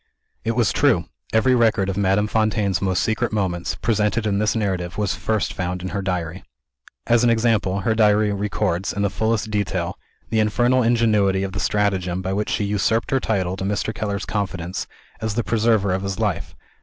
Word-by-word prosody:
It 115 - 0
was 120 -2 +2
true! 120 - +3 0.3
Every 110 +4 +3
record 115 -5 +3
of 95 - -2
Madame 100 +1 +2
Fontaine's 105 -4 0
most 95 -2 +1
secret 115 +2 0
moments, 95 -5 -1
presented 110 0 0
in 100 -2 +1
this 105 +1 +1
narrative, 95 -5 -2
was 105 -3 0
first 110 -2 -1
found 90 0 -3
in 95 - -3
her 100 +4 -3
Diary. 90 -2 -3 0.6
As 120 0 +3
an 120 - +4
example: 110 -4 +1
Her 110 - +1
Diary 105 -1 +3
records, 100 -2 -1
in 100 - -1
the 100 - +1
fullest 110 0 -1
detail, 105 -2 -2 0.3
the 110 - +2
infernal 120 +4 +3
ingenuity 110 -5 +2
of 95 - -3
the 100 - -4
stratagem 95 -4 0
by 95 +1 -2
which 105 +2 -1
she - - 0
usurped 105 +3 0
her 135 - +3
title 95 -6 -1
to 95 - -4
Mr. 105 +3 -1
Keller's 105 -1 -3
confidence, 95 -4 -3 0.3
as 110 -2 -2
the 120 - 0
preserver 110 -4 +2
of 95 - -1
his 100 -1 -3
life. - - -2
105 Hz, 190 wpm, -22 LUFS, 95-110 Hz, 0.6 s, an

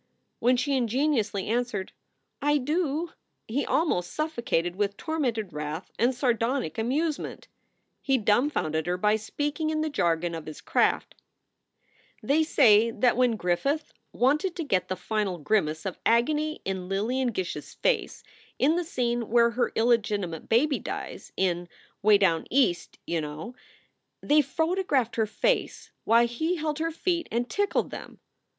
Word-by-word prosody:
When 250 +1 +3
she 275 +3 0
ingenuously 235 -5 0
answered, 225 -4 -1 0.5
"I 295 +1 +3
do," 310 +3 -1 0.4
he 270 +6 -1
almost 180 - +1
suffocated 235 - -1
with 200 0 -1
tormented 245 - -2
wrath 150 +3 -5
and 245 +3 +2
sardonic 240 - 0
amusement. 290 +7 -2 0.5
He 270 -1 +2
dumfounded 210 - +1
her 180 0 0
by 210 +3 +3
speaking 295 +8 -2
in 310 0 0
the 310 -1 -1
jargon 170 - 0
of 165 -2 -6
his 155 - -8
craft: - - +1 1.1
"They 295 +3 +3
say 230 -8 +5
that 245 +2 +2
when 245 -2 +3
Griffith 245 - -1 0.2
wanted 305 - +1
to 335 - -3
get 185 -10 0
the 185 - -2
final 195 0 -2
grimace 155 -1 0
of 190 - -4
agony 300 +7 +1
in 190 -1 -3
Lillian 240 +7 0
Gish 190 -7 -2
s 150 - -9
face - - 0 0.3
in 310 +5 +3
the 355 - 0
scene 240 -7 -2
where 235 0 +4
her 240 +1 0
illegitimate 210 -7 0
baby 275 +5 +3
dies - - -6
in 175 -2 0 0.3
Way 210 0 +6
Down 175 -5 +1
East, 250 -10 +1
you 170 -1 -1
know 155 +10 -6 0.7
they 300 +1 +4
photographed 295 - 0
her 220 -1 +2
face - - -1
while 230 +2 +5
he 315 +9 -1
held 305 -2 -2
her 325 +1 0
feet 340 +1 -1
and 240 +2 0
tickled 405 +6 0
them. - - -9
235 Hz, 145 wpm, -27 LUFS, 195-295 Hz, 1.1 s, Way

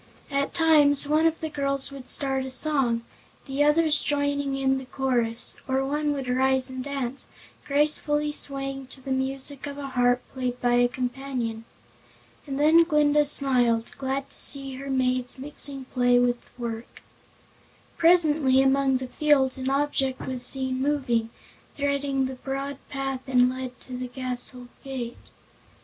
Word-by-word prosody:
At 280 0 -1
times 295 -4 +4
one 310 +2 +3
of 325 0 -2
the 315 - -3
girls 275 -2 -2
would 270 -2 -9
start 270 -2 0
a 265 - -5
song, 260 -4 +1 0.4
the 275 +1 0
others 300 0 +4
joining 285 -1 -1
in 265 0 +1
the 265 - -10
chorus, 245 -3 -1
or 265 0 0
one 295 +2 -1
would 270 -3 -4
rise 260 +1 +2
and 260 0 -5
dance, 275 -2 -4 0.4
gracefully 295 +1 +1
swaying 275 -2 -4
to 265 - -9
the 270 - -6
music 270 +1 -3
of 285 0 -7
a 280 -1 -5
harp 245 -1 +2
played 250 -2 -3
by 245 0 +1
a 245 0 +4
companion. 245 -2 -4 0.8
And 275 0 -4
then 315 +3 +6
Glinda 300 -2 +3
smiled, 245 -5 +2
glad 270 0 -3
to - - -7
see 275 -1 +5
her 275 +1 -7
maids 255 -1 0
mixing 275 0 -3
play 245 -1 +2
with 245 0 0
work. 230 -1 -7 0.9
Presently 315 -6 +4
among 270 0 +3
the 255 0 -6
fields 270 -2 +2
an 260 0 -2
object 275 -1 0
was 255 -1 -2
seen 260 0 0
moving, 260 -6 0 0.5
threading 280 -1 0
the 260 - -4
broad 275 0 -4
path 270 -1 -3
that 260 -1 0
led 255 0 +1
to 255 - -8
the 250 0 -4
castle 250 0 -3 0.2
gate. 255 -3 -5
270 Hz, 155 wpm, -25 LUFS, 255-285 Hz, 0.9 s, then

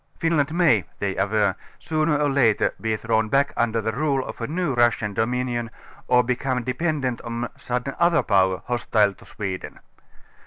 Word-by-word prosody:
Finland 155 -3 +1
may 160 - +4
ŌĆö - - -20
they 95 -2 -2
aver 105 +2 +2
ŌĆö - - -23 0.2
sooner 155 -1 0
or 145 -1 +2
later 125 -6 +3
be 110 -1 0
thrown 110 0 0
back 140 +4 +2
under 115 -1 +1
the 110 +1 -1
rule 140 +1 0
of - - -8
a 115 - -2
new 170 -2 -1
Russian 120 -3 +2
do 110 +3 +1
minion 120 -2 -2 0.4
or 125 0 +4
become 125 +1 -1
depedant 130 -1 -1
on 120 0 -4
some 125 0 -2 0.2
other 170 -1 +4
power, 95 -2 +2
hostile 110 -4 +1
to - - -18
Sweden. 95 -3 -6
120 Hz, 180 wpm, -23 LUFS, 110-140 Hz, 0.4 s, may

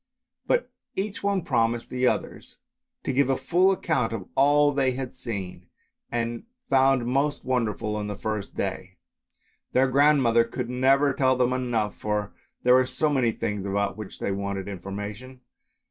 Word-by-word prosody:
But - - +1 0.2
each 200 +1 -3
one 200 -3 0
promised 115 -4 0
the 125 0 +1
others - - -3 0.5
to - - -1
give 135 0 +2
a 135 - +2
full 185 +3 +3
account 155 -11 0
of 100 -5 -5
all 145 +1 +4
that 135 -1 +1
she 130 - +1
had 130 -1 -5
seen, 95 -6 -6 0.4
and 120 - -2 0.3
found 135 -2 +4
most 140 +4 0
wonderful 115 -4 -1
on 105 -1 -3
the 105 - -4
first 105 -1 -4
day. - - -4 0.8
Their 130 +1 +4
grandmother 135 -4 +4
could 120 +1 -5
never 135 +3 +3
tell 130 -1 +2
them 125 0 +2
enough, 120 -5 -1
for 105 -1 -2 0.3
there 125 - +5
were 130 0 +5
so 155 +3 0
many 130 -5 +2
things 105 -2 -3
about 100 0 -1
which 110 -3 -8
they - - -2
wanted 100 0 -3
information. 105 +6 -7
125 Hz, 160 wpm, -26 LUFS, 105-135 Hz, 0.8 s, there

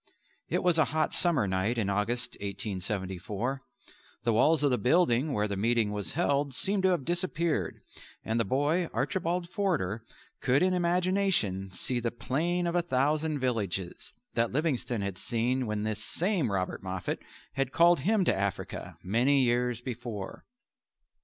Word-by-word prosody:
It - - 0
was 175 -2 +3
a 155 - +5
hot 155 +1 0
summer 155 - +3
night 95 +6 0
in 110 -4 +1
August 105 +5 0
(1874). 100 +4 -3 0.6
The 115 -1 +2
walls 150 +7 +4
of 145 - +3
the 125 - +1
building 140 -1 +3
where 105 -4 +1
the 100 - -3
meeting 110 +1 +2
was 105 -1 -3
held 140 -4 +1
seemed 200 +5 0
to 190 - +4
have 175 -8 0
disappeared 170 -2 0 0.5
and 110 +1 0
the - - +3
boy 145 - +1
Archibald 170 +4 -1
Forder 170 - -1 0.4
could 135 +5 +3
in 185 0 +3
imagination 180 - +1
see 120 +6 -1
"the 120 0 -1
plain 170 +9 -1
of 170 - 0
a 175 - +3
thousand 150 +1 +1
villages," 105 -9 -2 0.2
that 115 0 +1
Livingstone 130 -6 -1
had 100 -2 -3
seen 120 +2 0
when 105 -1 -2
this 110 0 -3
same 170 - 0
Robert 95 -2 -2
Moffat 95 -1 -3 0.3
had 135 -1 -1
called 170 +2 +5
him 195 +6 +2
to - - +4
Africa 100 -1 -3
many 125 +8 +3
years 120 -1 +1
before. 120 -5 -6
125 Hz, 155 wpm, -29 LUFS, 105-165 Hz, 0.6 s, a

